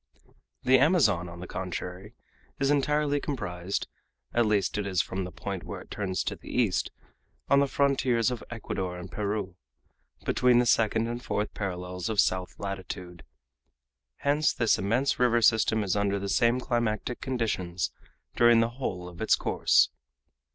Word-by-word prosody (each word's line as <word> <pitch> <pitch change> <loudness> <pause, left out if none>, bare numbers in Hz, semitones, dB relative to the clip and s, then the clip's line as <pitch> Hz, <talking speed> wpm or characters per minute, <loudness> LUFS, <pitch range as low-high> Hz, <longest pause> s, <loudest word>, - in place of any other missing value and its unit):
The 130 0 +5
Amazon, 120 - +3
on 85 0 -10
the - - -5
contrary, 90 +3 -6 0.4
is 140 +1 +2
entirely 145 0 +2
comprised 100 - -3 0.5
at 120 -2 +3
least 105 0 +1
it 100 - -2
is 95 -3 0
from 95 +2 -1
the 90 - -7
point 100 -1 -5
where - - -6
it - - -15
turns 95 -3 -2
to - - -3
the - - -13
east, 115 -7 +1 0.6
on 140 - +6
the 140 - +3
frontiers 130 -4 +2
of 125 - -5
Ecuador 95 -5 -4
and 90 0 -9
Peru 100 -2 -3 0.7
between 125 -1 +4
the 120 - +4
second 115 0 +2
and 120 +1 -5
fourth 105 +1 -2
parallels 90 -1 -4
of 110 -2 -1
south 95 -1 +1
latitude. 95 -3 -6 0.9
Hence 145 +2 +1
this 115 -3 +2
immense 115 +8 +1
river 120 -1 +4
system 110 -1 +3
is 95 -1 0
under 100 -1 +1
the 100 0 -4
same 120 +4 +3
climatic 120 -1 -1
conditions 105 -9 -2 0.4
during 120 -1 +6
the 115 0 +2
whole 100 -8 -4
of 90 +1 -11
its 110 - +4
course. - - +3
105 Hz, 160 wpm, -28 LUFS, 95-125 Hz, 0.9 s, on